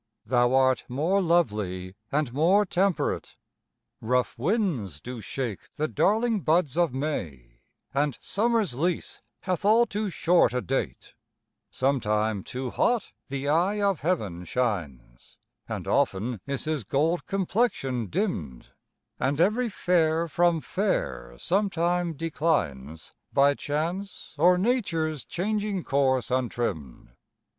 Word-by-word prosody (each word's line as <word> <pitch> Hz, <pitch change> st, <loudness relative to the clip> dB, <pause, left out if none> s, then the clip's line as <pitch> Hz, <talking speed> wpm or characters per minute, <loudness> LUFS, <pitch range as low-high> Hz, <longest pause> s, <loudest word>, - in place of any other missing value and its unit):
Thou 120 Hz, +2 st, +3 dB
art 130 Hz, -1 st, +3 dB
more 160 Hz, +10 st, +1 dB
lovely 105 Hz, -, 0 dB, 0.2 s
and 145 Hz, -4 st, 0 dB
more 180 Hz, +9 st, +4 dB
temperate: 190 Hz, 0 st, 0 dB, 0.7 s
Rough 125 Hz, +2 st, 0 dB
winds 135 Hz, -, -1 dB
do 125 Hz, +8 st, -7 dB
shake 115 Hz, -1 st, -5 dB
the 155 Hz, -1 st, 0 dB
darling 220 Hz, +6 st, +2 dB
buds 160 Hz, -4 st, +1 dB
of 170 Hz, -3 st, +2 dB
May, 80 Hz, -, -4 dB, 0.3 s
And 140 Hz, -1 st, 0 dB
summer's 225 Hz, -, +1 dB
lease 170 Hz, +7 st, -2 dB, 0.2 s
hath 185 Hz, -1 st, -2 dB
all 220 Hz, +4 st, +5 dB
too 210 Hz, -1 st, -2 dB
short 170 Hz, -7 st, +3 dB
a 125 Hz, -, +1 dB
date: 125 Hz, -, -3 dB, 0.6 s
Sometime 110 Hz, -6 st, 0 dB
too 130 Hz, 0 st, -5 dB
hot 240 Hz, -3 st, +1 dB, 0.2 s
the 140 Hz, +1 st, -4 dB
eye 175 Hz, +8 st, +2 dB
of 200 Hz, -5 st, +1 dB
heaven 110 Hz, -, -1 dB
shines, 80 Hz, -, -4 dB, 0.3 s
And -, -, -4 dB
often 110 Hz, +3 st, 0 dB
is 140 Hz, -1 st, -3 dB
his 155 Hz, -5 st, -1 dB
gold 155 Hz, -, 0 dB
complexion 190 Hz, -, 0 dB
dimm'd, 95 Hz, -, -3 dB, 0.5 s
And 140 Hz, +4 st, 0 dB
every 220 Hz, +7 st, +2 dB
fair 170 Hz, -4 st, +1 dB
from 170 Hz, +1 st, +2 dB
fair 60 Hz, -, -2 dB
sometime 175 Hz, -, 0 dB
declines, 140 Hz, -, -2 dB, 0.2 s
By 140 Hz, +1 st, +4 dB
chance, 170 Hz, +8 st, -4 dB
or 180 Hz, +3 st, +6 dB
nature's 170 Hz, -, 0 dB
changing 205 Hz, 0 st, -2 dB
course, 130 Hz, -3 st, +1 dB
untrimm'd. 120 Hz, -, -2 dB
150 Hz, 115 wpm, -26 LUFS, 120-180 Hz, 0.7 s, or